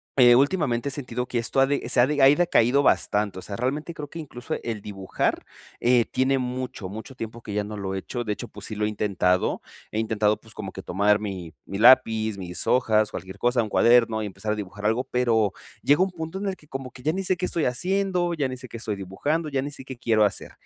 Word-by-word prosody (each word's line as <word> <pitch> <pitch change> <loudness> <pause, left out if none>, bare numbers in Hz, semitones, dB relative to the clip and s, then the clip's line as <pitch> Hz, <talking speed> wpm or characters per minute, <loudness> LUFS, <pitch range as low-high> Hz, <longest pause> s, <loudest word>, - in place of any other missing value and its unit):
eh, 120 -2 +7
últimamente 140 -3 +2
he - - -5
sentido 125 -3 -3
que 120 -1 -1
esto 115 +3 -1
ha 135 - +6
de 140 +1 -2
se - - +1
ha 120 - +7
de 145 0 0
ha - - +8
decaído 140 -4 +4
bastante, 105 -6 +1
o - - -8
sea, 100 - -6
realmente 145 +8 -2
creo 145 -2 -7
que 165 - -7
incluso 120 -5 -6
el 115 -2 -4
dibujar, 95 -2 -2 0.4
eh, 120 -1 +4
tiene 130 +1 +1
mucho, 125 -4 -4
mucho 110 +6 -8
tiempo 115 0 -7
que 105 -3 -6
ya 105 - +1
no 105 +1 -7
lo 95 -1 -3
he - - -2
hecho. 120 +5 -4
De 110 - -3
hecho, - - -7
pues 105 - -10
sí 110 - -6
lo 105 - 0
he - - 0
intentado. 95 -3 0 0.3
He 110 - -4
intentado, 110 -1 +1
pues 110 0 -16
como 100 -3 -6
que - - -9
tomar 100 +3 +2
mi 95 -6 -6
mi 100 +1 -5
lápiz, 110 -3 +5
mis 90 -2 -5
hojas, 110 -4 +3
cualquier 95 +1 -8
cosa, 120 -1 +2
un 110 - -5
cuaderno 115 -1 +4
y 105 - -3
empezar 105 +2 -4
a - - +1
dibujar 105 0 -7
algo, 110 +4 +2
pero 115 -5 +1 0.3
llega 145 +6 +4
un 190 - -1
punto 160 +1 -6
en 200 - -4
el 195 -2 -2
que 150 - -21
como 135 -2 -6
que 125 - -13
ya 155 +4 +1
ni 195 +3 -3
sé 185 0 +1
qué 180 +1 -2
estoy 165 - -1
haciendo, 180 +5 0
ya 145 -4 0
ni 130 - -5
sé 125 0 -10
qué 115 - -8
estoy 110 -2 -3
dibujando, 145 - -2
ya 135 -2 -1
ni 145 - -5
sé 135 -1 -9
qué 130 -2 -8
quiero 110 -3 +3
hacer. 100 - -2
120 Hz, 255 wpm, -25 LUFS, 105-135 Hz, 0.4 s, ha